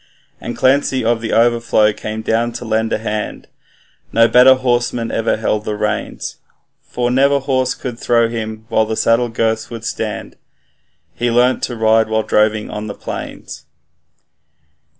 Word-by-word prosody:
And - - -6
Clancy 130 -2 +2
of 115 0 +1
the 115 - -3
Overflow 115 -2 +3
came 110 +1 -6
down 115 +2 0
to 120 - -7
lend 110 0 0
a - - +1
hand, 110 -1 -4 0.6
No 115 0 +5
better 125 +2 +7
horseman 120 -2 -1
ever 115 - 0
held 110 -1 -1
the 105 -1 -3
reins; 105 0 -3 0.4
For 120 0 -2
never 140 +2 +3
horse 130 -2 0
could 125 -2 -6
throw 115 -1 +2
him 110 -1 -5
while 110 -1 +2
the 110 - -2
saddle 120 +1 +2
girths 110 -1 -1
would 115 -1 -8
stand, 110 -4 -4 0.8
He 120 +1 -1
learnt 125 +2 +2
to 120 - -6
ride 110 0 +3
while 110 0 +1
droving 105 0 +1
on 105 +1 -5
the 105 - -6
plains. - - -8
115 Hz, 155 wpm, -17 LUFS, 110-120 Hz, 0.8 s, better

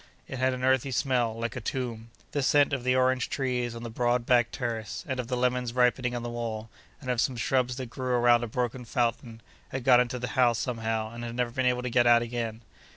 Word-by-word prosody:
—it 135 - -6
had 130 0 +2
an 125 0 -4
earthy 130 0 +2
smell, 120 -2 0
like 115 +2 -3
a 130 - -4
tomb. 115 -1 -4 0.2
The 145 - -1
scent 145 +1 +3
of 130 -3 -1
the 130 0 +2
orange 130 -1 +2
trees 125 -3 -2
on 115 - -7
the 120 - -5
broad 120 +1 0
back 120 -2 +4
terrace, 115 +1 -4
and 130 -2 -3
of 125 - -3
the 125 0 -2
lemons 125 -1 0
ripening 125 0 +2
on 120 - -4
the 120 - -4
wall, 115 -2 -5 0.3
and 130 -4 -3
of 120 -2 +1
some 130 - 0
shrubs 125 +1 +1
that 130 -3 -6
grew 130 -1 -2
around 120 0 +4
a - - -2
broken 125 +2 -2
fountain, 115 -1 -2 0.3
had 130 -1 -4
got 125 -1 +6
into 125 0 0
the 125 -1 -4
house 120 -1 +3
somehow, 115 -2 -2
and 120 0 -7
had 120 0 -5
never 125 -1 -1
been 130 +1 0
able 125 0 +1
to 125 - -2
get 120 0 +4
out 120 0 +6
again. 115 -1 -4
125 Hz, 240 wpm, -28 LUFS, 115-130 Hz, 0.3 s, got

